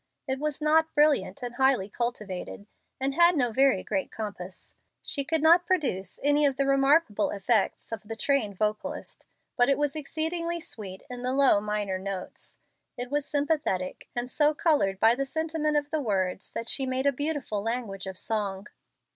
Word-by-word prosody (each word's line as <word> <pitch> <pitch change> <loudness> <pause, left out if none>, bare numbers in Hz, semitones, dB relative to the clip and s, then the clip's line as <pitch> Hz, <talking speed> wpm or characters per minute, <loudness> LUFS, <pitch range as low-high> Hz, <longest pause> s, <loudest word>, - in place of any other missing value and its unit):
It 265 0 -1
was 300 0 -3
not 320 +1 +3
brilliant 295 -2 +2
and 240 -1 -4
highly 260 -6 +2
cultivated, 210 -4 -4 0.3
and 270 +1 0
had 340 +3 +5
no 245 -4 +2
very 265 -4 +3
great 195 -3 -2
compass. 200 -4 -7 0.3
She 280 - 0
could 320 +1 0
not 340 +2 +6
produce 260 - -1
any 290 +1 +4
of 275 -2 +2
the 275 - +2
remarkable 275 -5 +3
effects 205 +2 +1
of 225 -3 -4
the 225 +1 -7
trained 225 -5 +1
vocalist. 215 +1 -3 0.3
But 245 +1 +4
it 275 - +3
was 290 -1 -1
exceedingly 330 +3 -1
sweet 195 - -8
in 245 -1 -7
the 255 +1 -1
low, 270 -6 +5
minor 205 -2 -2
notes. 190 -1 -7 0.4
It 245 +1 -4
was 290 -1 -1
sympathetic, 285 - -1
and 240 0 -2
so 295 +3 +2
colored 285 - +1
by 225 +2 +6
the 270 +3 -1
sentiment 310 +1 -1
of 290 0 -2
the 310 -1 0
words 190 -5 -2
that 230 - -4
she 270 +1 +1
made 260 +1 -1
a 280 - +5
beautiful 285 -6 -2
language 215 -4 -4
of 190 -1 -6
song. 200 -3 -2
260 Hz, 175 wpm, -27 LUFS, 210-295 Hz, 0.4 s, not